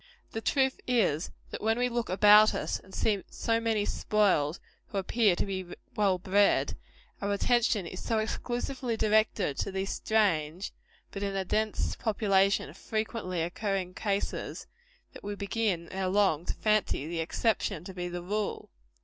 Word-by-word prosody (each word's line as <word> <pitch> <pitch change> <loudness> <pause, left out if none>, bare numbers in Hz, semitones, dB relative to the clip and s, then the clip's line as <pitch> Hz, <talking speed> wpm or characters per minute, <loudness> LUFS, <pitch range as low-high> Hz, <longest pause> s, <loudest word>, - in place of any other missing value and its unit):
The 225 - -4
truth 265 +2 +1
is, 195 -10 +2 0.2
that - - -5
when 225 +1 +2
we 245 0 +2
look 240 -1 -2
about 210 +3 +7
us - - -2
and 190 - -18
see 205 -1 0
so 230 0 0
many 225 -2 0
spoiled, 190 -9 +1 0.3
who 200 - -5
appear 200 0 +2
to - - -1
be 185 -3 -5 0.2
well 200 -3 +3
bred, 200 +2 +2 0.5
our 200 0 -1
attention 225 -2 +2
is 180 +2 -7
so 225 - 0
exclusively 240 +2 -2
directed 215 -8 +2
to - - -1
these 190 0 -2
strange, 185 -5 0 0.4
but, 195 - -6
in 200 -1 -2
a 190 -1 -1
dense 215 +3 0
population, 200 -3 +2
frequently 215 -6 -3
occurring 185 +1 -2
cases, 200 0 -3 0.5
that - - -12
we 205 0 -4
begin, 200 -4 -1
ere 190 0 -2
long, 185 -4 +2
to - - 0
fancy 215 -9 +1
the 170 0 -3
exception 190 0 0
to 190 - -8
be 180 -1 -4
the 175 0 -5
general 175 - -12
rule. 210 0 -2
200 Hz, 160 wpm, -29 LUFS, 185-220 Hz, 0.5 s, about